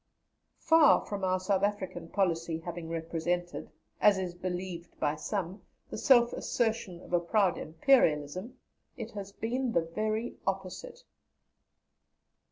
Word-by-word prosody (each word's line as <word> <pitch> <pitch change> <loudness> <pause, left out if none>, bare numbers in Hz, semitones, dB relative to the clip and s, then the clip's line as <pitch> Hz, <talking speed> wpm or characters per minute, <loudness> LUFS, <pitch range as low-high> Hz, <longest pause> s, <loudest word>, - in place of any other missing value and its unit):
Far 325 -2 +5
from 200 -1 -5
our 185 0 +2
South 190 +1 +1
African 190 -4 -2
policy 165 -3 0
having 170 0 -7
represented, 165 +2 -3 0.3
as 205 -2 +5
is 185 -2 -3
believed 180 -1 -5
by 145 - +1
some, 190 +2 -4 0.3
the - - -4
self 240 -3 +5
assertion 220 -7 -1
of - - -12
a 175 - +5
proud 185 +1 +2
Imperialism, 165 - +2 0.4
it 230 -2 -6
has 200 -1 -7
been 240 +4 -2
the 170 - +3
very 215 +7 -2
opposite. 195 - -4
185 Hz, 125 wpm, -30 LUFS, 170-220 Hz, 0.4 s, Far